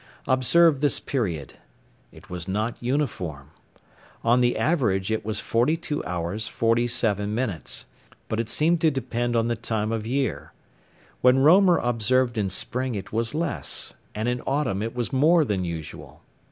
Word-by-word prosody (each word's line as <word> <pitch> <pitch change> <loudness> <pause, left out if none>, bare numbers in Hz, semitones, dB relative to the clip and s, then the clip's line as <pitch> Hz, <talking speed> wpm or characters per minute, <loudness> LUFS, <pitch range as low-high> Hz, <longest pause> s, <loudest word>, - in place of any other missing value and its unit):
Observe 140 +3 +4
this 145 - +2
period. 85 - -3 0.6
It - - -16
was 90 0 -6
not 110 +5 -1
uniform. 105 - -2 0.7
On 120 +2 +4
the 120 0 +2
average 110 - +1
it 110 - -1
was 105 -1 -2
42 150 +6 0
hours 90 +5 -3
47 115 -3 +1
minutes, 105 - -3 0.4
but 110 - -2
it 115 -1 -2
seemed 160 +7 +2
to 160 - +5
depend 120 -4 -2
on 115 0 +2
the 120 - 0
time 110 -1 -2
of 110 -1 -3
year. 130 - -2 0.7
When 125 +1 +5
Roemer 175 +6 +6
observed 120 0 +1
in 100 -2 0
spring 125 +6 -2
it 100 0 -7
was 115 +4 0
less, 165 -2 -2 0.2
and 110 +2 -2
in 125 0 -1
autumn 135 -8 0
it 115 +2 -4
was 120 -1 -3
more 155 +4 +4
than 100 -6 -1
usual. 85 -3 -7
115 Hz, 155 wpm, -25 LUFS, 105-135 Hz, 0.7 s, Roemer